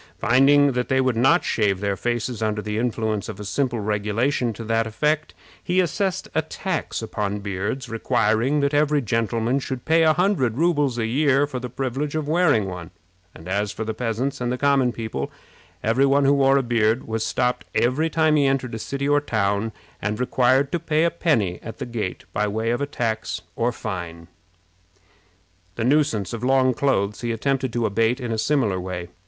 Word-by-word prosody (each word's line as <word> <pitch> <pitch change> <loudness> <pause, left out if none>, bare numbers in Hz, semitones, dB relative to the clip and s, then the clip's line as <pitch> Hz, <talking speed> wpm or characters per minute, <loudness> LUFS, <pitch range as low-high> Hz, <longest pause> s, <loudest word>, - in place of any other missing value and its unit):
Finding 140 +4 +5
that 125 -1 -2
they 130 - +2
would 130 -2 +1
not 135 +9 +4
shave 100 -4 +1
their 100 0 -1
faces 120 +2 -2
under 105 -1 0
the 105 0 -3
influence 110 -4 -1
of 105 -2 -7
a 105 - -6
simple 120 +3 -1
regulation 110 +5 0
to 115 - -8
that 115 0 0
effect, 150 +7 -1 0.3
he 180 +1 +1
assessed 185 +2 0
a 160 - +2
tax 160 -4 -4
upon 105 -2 -2
beards, 100 +6 -3
requiring 115 +4 +1
that 140 +1 +1
every 150 0 +3
gentleman 115 +3 0
should 130 -2 -5
pay 165 +1 +4
a 160 -1 +5
hundred 155 - +1
rubles 145 -6 +1
a 115 - 0
year 140 +3 +2
for 130 -3 -5
the 125 0 -6
privilege 135 +4 -3
of 155 -2 -2
wearing 155 - +3
one; 90 -2 -7 0.5
and 80 - -12
as 100 +2 -1
for 110 - -5
the 110 - -2
peasants 125 +4 -2
and 125 +1 -1
common 140 -3 +3
people, 110 - -4 0.5
every 125 +5 +3
one 140 +1 +3
who 140 - +5
wore 135 -1 +4
a 135 - +1
beard 115 -1 +1
was 110 0 -2
stopped 125 -7 -1
every 130 +8 +2
time 160 -1 +2
he 140 -2 +3
entered 135 -3 -1
a 110 - -4
city 140 +4 -3
or 145 0 +3
town, 105 -3 0 0.3
and 105 +1 -2
required 130 +2 +2
to 175 - 0
pay 160 -1 +1
a 170 - +2
penny 130 - 0
at 115 -1 -8
the - - -4
gate 115 -6 -4
by 105 - 0
way 110 +3 -1
of 140 +4 -1
tax 110 -5 -3
or 120 +1 +1
fine. 85 -7 -6 1.5
The 115 - -2
nuisance 125 -7 +1
of 115 0 -5
long 130 0 +3
clothes 105 -6 0
he 120 -1 -2
attempted 130 +2 -1
to 120 -1 0
abate 115 +4 +1
in 120 -3 -4
a 110 - -1
similar 110 -6 +1
way. 90 -1 -5
120 Hz, 190 wpm, -23 LUFS, 110-140 Hz, 1.5 s, Finding